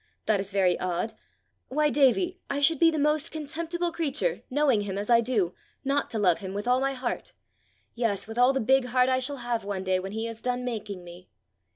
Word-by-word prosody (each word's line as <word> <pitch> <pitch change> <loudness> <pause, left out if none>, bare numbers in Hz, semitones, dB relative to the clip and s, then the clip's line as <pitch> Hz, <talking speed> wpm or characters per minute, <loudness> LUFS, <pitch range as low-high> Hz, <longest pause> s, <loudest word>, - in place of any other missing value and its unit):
That 215 -2 +2
is 195 +1 -3
very 190 -3 +2
odd! 180 +4 -2 0.5
Why, 300 +2 +1
Davie, 350 +7 +3
I 280 - -1
should 295 +1 +4
be 330 - +6
the 320 - -2
most 300 +2 +1
contemptible 330 +3 -3
creature, 335 - -1
knowing 275 -5 +2
him 195 -1 -4
as 205 +4 -2
I 235 0 +6
do, 215 -7 0 0.3
not 280 +1 +1
to 225 - -3
love 185 -5 +3
him 190 -1 -6
with 205 +3 -4
all 250 +1 +4
my 275 0 0
heart 255 -2 -4 0.6
yes, 225 -5 -1
with 225 +2 -6
all 250 +2 +6
the 270 - 0
big 265 +3 +3
heart 250 +1 +2
I 260 0 +2
shall 275 +2 -1
have 235 -3 -1
one 200 -2 -3
day 185 -1 +1
when 190 +2 -6
he 220 +1 -2
has 230 -1 -7
done 250 0 -2
making 210 -6 -5
me." 175 +1 -13
245 Hz, 220 wpm, -27 LUFS, 205-285 Hz, 0.6 s, be